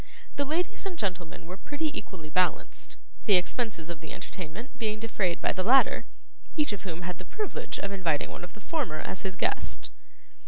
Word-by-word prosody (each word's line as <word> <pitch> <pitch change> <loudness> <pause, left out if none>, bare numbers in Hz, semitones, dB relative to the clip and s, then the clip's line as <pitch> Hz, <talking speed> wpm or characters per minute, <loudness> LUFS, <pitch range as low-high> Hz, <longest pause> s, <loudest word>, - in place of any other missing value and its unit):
The 285 - +2
ladies 355 +7 0
and 365 -3 -4
gentlemen 180 - -2
were 180 +3 -6
pretty 300 +7 -1
equally 165 - -5
balanced; 180 +1 +2 0.3
the 205 - +8
expenses 185 -2 +1
of 170 -3 -5
the 160 - -6
entertainment 190 - -6
being 215 -2 +1
defrayed 205 -6 +1
by - - +3
the 185 - 0
latter, 255 +8 +6 0.5
each 295 -7 +4
of 200 - -4
whom 175 -2 -4
had 180 -1 -3
the - - -6
privilege 420 - -2
of 200 - -2
inviting 170 -7 +1
one - - -7
of 175 - -7
the 215 - -12
former 265 - 0
as 190 - -3
his 190 -1 -2
guest. - - 0
195 Hz, 190 wpm, -30 LUFS, 180-250 Hz, 0.5 s, the